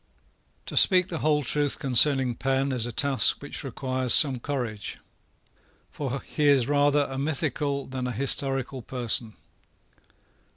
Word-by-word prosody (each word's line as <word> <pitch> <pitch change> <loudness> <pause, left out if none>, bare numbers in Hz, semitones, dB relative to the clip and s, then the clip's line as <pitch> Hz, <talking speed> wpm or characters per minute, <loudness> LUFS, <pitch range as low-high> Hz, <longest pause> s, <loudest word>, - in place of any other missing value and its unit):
To - - -7
speak 185 -2 +5
the 165 - -5
whole 150 -1 +1
truth 145 +2 -1
concerning 130 0 +4
Penn 135 +3 -1
is 120 -2 +1
a - - -5
task 140 +3 +2
which 145 +2 -7
requires 130 -1 0
some 135 -4 +3
courage; 120 -6 -5 0.9
for 140 -2 -5
he 150 -1 -2
is 135 -4 +3
rather 145 0 +2
a 135 0 -6
mythical 140 -1 -2
than 130 -1 -5
a - - -3
historical 135 +1 -3
person. 120 -2 -2
135 Hz, 135 wpm, -25 LUFS, 125-145 Hz, 0.9 s, speak